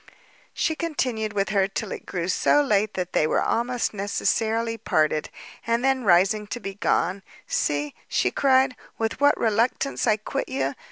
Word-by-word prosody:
She 320 Hz, -, 0 dB
continued 250 Hz, -10 st, -2 dB
with 200 Hz, -1 st, 0 dB
her 195 Hz, -2 st, +2 dB
till 195 Hz, -, -4 dB
it -, -, -7 dB
grew 175 Hz, -2 st, -3 dB
so 290 Hz, +9 st, +3 dB
late 215 Hz, -5 st, +1 dB
that 180 Hz, -1 st, -3 dB
they 155 Hz, -, +3 dB
were -, -, +1 dB
almost 240 Hz, 0 st, 0 dB
necessarily 225 Hz, +3 st, 0 dB
parted; 155 Hz, -7 st, 0 dB, 0.4 s
and 230 Hz, +1 st, +1 dB
then 265 Hz, -1 st, +2 dB
rising 195 Hz, +3 st, +3 dB
to 240 Hz, -, -5 dB
be 195 Hz, -4 st, -6 dB
gone, 190 Hz, -1 st, 0 dB, 0.2 s
"See," 145 Hz, 0 st, -1 dB
she 125 Hz, -, +1 dB
cried, 265 Hz, -, +3 dB, 0.2 s
"with 225 Hz, +2 st, -2 dB
what 285 Hz, 0 st, +5 dB
reluctance 230 Hz, +5 st, 0 dB
I 215 Hz, -1 st, +4 dB
quit 215 Hz, -, -4 dB
you! 135 Hz, +1 st, -1 dB
215 Hz, 165 wpm, -24 LUFS, 190-245 Hz, 0.4 s, what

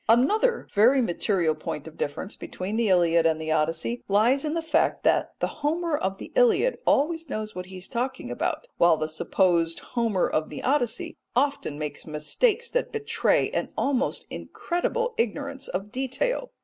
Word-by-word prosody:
Another 420 Hz, -, +3 dB
very 235 Hz, +7 st, +5 dB
material 180 Hz, -6 st, +1 dB
point 155 Hz, -1 st, -6 dB
of 160 Hz, -, -11 dB
difference 165 Hz, +7 st, -4 dB
between 190 Hz, +4 st, -5 dB
the 225 Hz, -2 st, +1 dB
Iliad 170 Hz, -2 st, +4 dB
and 160 Hz, -1 st, +1 dB
the 160 Hz, 0 st, -3 dB
Odyssey 165 Hz, +9 st, 0 dB
lies 225 Hz, +7 st, +3 dB
in 305 Hz, +1 st, -1 dB
the 330 Hz, -, -1 dB
fact 320 Hz, -, +1 dB
that -, -, +2 dB
the -, -, -3 dB
Homer 325 Hz, +2 st, 0 dB
of 195 Hz, -7 st, -2 dB
the -, -, -9 dB
Iliad -, -, +3 dB
always 325 Hz, +1 st, +2 dB
knows 215 Hz, -3 st, -4 dB
what 180 Hz, 0 st, -6 dB
he 190 Hz, 0 st, -9 dB
is 185 Hz, -, -7 dB
talking 255 Hz, +2 st, -3 dB
about, -, -, -2 dB
while 170 Hz, -2 st, +5 dB
the 155 Hz, -, -2 dB
supposed 165 Hz, +1 st, +1 dB, 0.2 s
Homer 230 Hz, -6 st, +1 dB
of 155 Hz, 0 st, -1 dB
the -, -, -7 dB
Odyssey 255 Hz, -4 st, 0 dB, 0.2 s
often 270 Hz, -, 0 dB
makes 150 Hz, +1 st, -5 dB
mistakes 415 Hz, -, 0 dB
that -, -, 0 dB
betray 440 Hz, -1 st, +1 dB
an -, -, -2 dB
almost 270 Hz, -1 st, 0 dB
incredible 470 Hz, +7 st, -2 dB
ignorance 275 Hz, +4 st, -2 dB
of 195 Hz, +3 st, -4 dB
detail. 270 Hz, -, -1 dB
230 Hz, 170 wpm, -26 LUFS, -, 0.2 s, very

